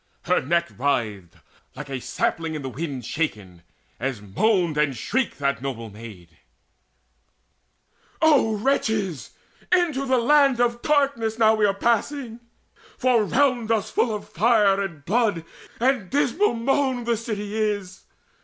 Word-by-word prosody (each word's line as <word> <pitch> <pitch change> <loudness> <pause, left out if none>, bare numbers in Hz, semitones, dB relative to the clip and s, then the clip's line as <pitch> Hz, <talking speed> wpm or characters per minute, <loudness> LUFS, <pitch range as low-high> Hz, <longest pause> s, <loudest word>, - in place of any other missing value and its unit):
Her 180 +1 +2
neck 170 0 0
writhed, 105 -10 -1 0.4
like 150 - -7
a 135 -2 -5
sapling 160 +5 -2
in 150 - -5
the 135 - -4
wind 135 -3 -5
Shaken, 105 - -4 0.4
as 130 -2 -3
moaned 170 - +1
and 145 -4 0
shrieked 265 -2 -1
that 140 -2 -1
noble 115 -5 -5
maid: 100 -7 -12 1.8
"O 285 -9 +4
wretches! 205 - -1 0.4
into 320 -7 +2
the 260 0 +3
Land 275 +1 +4
of 240 0 +1
Darkness 275 -7 +1
now 220 -1 +5
We 215 -1 +3
are 195 - 0
passing; 235 +3 -1 0.6
for 255 0 +2
all 235 -3 +4
round 250 -1 +1
us 220 -2 0
full 225 -3 +1
of 210 - -8
fire 210 -4 +3
And 165 -7 -6
blood 205 -5 +1 0.3
and 240 -6 +1
dismal 290 - +1
moan 260 +1 0
the 235 0 +1
city 210 -2 -5
is. 205 -4 -2
210 Hz, 140 wpm, -23 LUFS, 150-245 Hz, 1.8 s, now